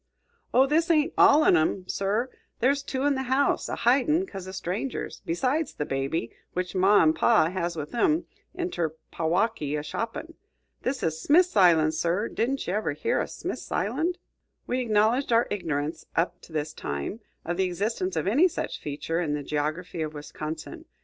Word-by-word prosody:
"Oh, 260 +2 +5
this 320 +5 +2
ain't 305 -3 +3
all 300 +2 +6
on 180 - +5
'em, 175 +3 +1
sir; 210 +7 -1 0.3
there's 275 +3 +2
two 265 -1 -3
in 290 0 +3
the 265 - -2
house, 275 +2 +2
a - - -2
hidin' 280 +9 +3
'cause 190 - -8
o' - - -6
strangers, 190 +7 -4
besides 260 - 0
the 150 - -2
baby, 135 -1 -2 0.2
which 180 0 -2
ma 190 +1 +5
and 155 0 +4
pa 200 -8 +4
has 175 -2 -2
with 150 -2 -6
'em 305 +8 +2 0.3
inter 175 - -2 0.2
Packwaukee, 165 -3 0
a 145 - -4
shoppin'. 230 - -5 0.5
This 265 +1 -2
is 160 -1 -1
Smith's 355 - +4
Island, 165 -5 +5
sir. 175 +7 0
Didn't 270 +4 -1
ye 180 - -2
ever 210 -8 0
hear 145 - 0
o' - - -3
Smith's - - -6
Island?" 295 - 0 0.5
We 250 - -1
acknowledged 230 +3 +2
our 230 +1 +4
ignorance, 155 -6 -3
up 175 +2 0
to - - -16
this 155 0 -3
time, 70 - -4 0.3
of 175 +1 -2
the 190 - +2
existence 185 0 -2
of 160 - -1
any 270 - +5
such 350 - -4
feature 150 +3 -2
in 150 -4 -1
the 145 - -4
geography 155 +4 -3
of 155 -1 -3
Wisconsin. 155 - -7
190 Hz, 180 wpm, -26 LUFS, 160-260 Hz, 0.5 s, all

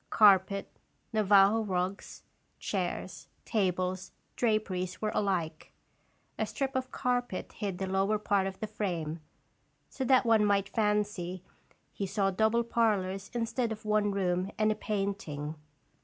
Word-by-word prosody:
Carpet, 195 -1 +5 0.5
Navajo 205 0 +5
rugs, 190 -1 -3 0.3
chairs, - - -3 0.2
tables, 185 -3 -1 0.2
draperies 190 -5 0
were 215 -1 -1
alike. 170 -6 -1 0.7
A - - 0
strip 270 -1 -3
of 260 0 -1
carpet 245 -7 -2
hid 200 -4 -4
the 190 - -2
lower 195 +3 +1
part 200 -2 +1
of 190 0 -7
the - - -2
frame, 175 -7 -3 0.7
so 265 - -3
that 255 0 +4
one 225 -2 +5
might 200 -1 +2
fancy 210 -5 -1 0.5
he 200 - -3
saw 195 0 +1
double 220 +4 +2
parlors 200 -5 0
instead 230 0 -1
of 215 0 -6
one 210 -1 +2
room 185 -1 0
and 215 0 +3
a - - 0
painting. 195 -9 -3
200 Hz, 130 wpm, -30 LUFS, 185-215 Hz, 0.7 s, Carpet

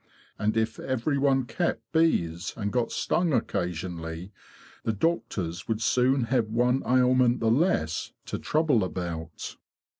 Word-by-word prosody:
And 105 +1 +1
if 110 0 0
every 130 +2 -1
one 135 -2 +3
kept 115 -1 -2
bees, 90 - +1
and 105 -2 -2
got 125 -2 0
stung 170 -3 +1
occasionally, 90 -4 -3 0.5
the 110 - -1
doctors 95 - -1
would 110 -1 -1
soon 125 +3 +2
have 115 -1 +1
one 125 +4 +2
ailment 125 -1 +4
the 110 -1 +2
less 120 - +1
to - - -4
trouble 150 -8 +2
about." 85 -3 -5
115 Hz, 130 wpm, -27 LUFS, 90-130 Hz, 0.5 s, ailment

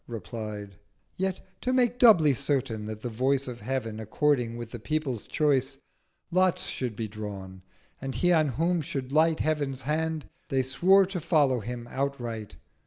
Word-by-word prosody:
replied: 105 -3 -6 0.4
Yet 190 0 -2 0.2
to 255 - 0
make 245 -1 +2
doubly 170 - +7
certain 125 -5 -1
that 110 0 -6
the 125 - -3
Voice 130 +4 +1
Of 120 -2 -6
Heav'n 120 -5 -3
according 120 +1 +1
with 120 -1 -7
the 120 - -6
People's 135 -2 -2
Choice, 135 -3 +1 0.5
Lots 185 0 +2
should 125 -4 -3
be 110 +1 -3
drawn; 100 -3 -7 0.4
and 135 -1 -4
He 180 0 +3
on 155 -2 +4
whom 165 +6 +1
should 135 -3 -4
light 160 +2 +3
Heav'n's 145 -4 -1
Hand—they 155 -3 -2
swore 180 +10 +5
to 185 -1 -4
follow 145 -6 +3
him 120 +2 -6
outright. 120 -6 -3
135 Hz, 155 wpm, -28 LUFS, 115-155 Hz, 0.5 s, doubly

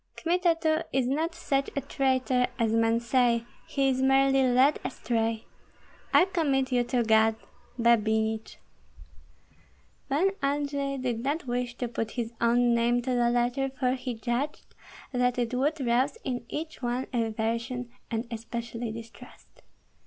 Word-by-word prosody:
Kmita 345 0 +1
too 315 -1 +2
is 260 -2 +1
not 320 +6 -1
such 275 -5 -1
a 280 - 0
traitor 260 -2 +1
as 225 -2 +1
men 225 0 +3
say; 235 -1 +2 0.2
he 275 -1 +1
is 260 -1 +1
merely 270 0 +4
led 260 +3 +4
astray. 225 -3 -2 0.7
I - - +6
commit 275 -8 0
you 245 -1 +3
to 240 0 +1
God. 220 0 +4 0.4
Babinich. 220 -1 +1 1.5
Pan 330 +8 +2
Andrei 280 0 -1
did 250 -3 -2
not 290 +4 -1
wish 245 0 -2
to 245 - -3
put 225 -1 -3
his 235 -1 -2
own 240 +1 +3
name 240 +1 +2
to 255 - -2
the 240 -1 +3
letter, 245 +3 +1
for 255 -2 +2
he 250 -2 -4
judged 240 +6 -3 0.4
that 250 -1 +1
it 240 0 -1
would 290 +5 0
rouse 250 +4 +1
in 245 -2 -3
each 315 -1 -5
one 245 +1 -1
aversion 230 +2 -2 0.2
and 230 0 -2
especially 230 0 -5
distrust. 230 0 -12
245 Hz, 145 wpm, -28 LUFS, 235-275 Hz, 1.5 s, I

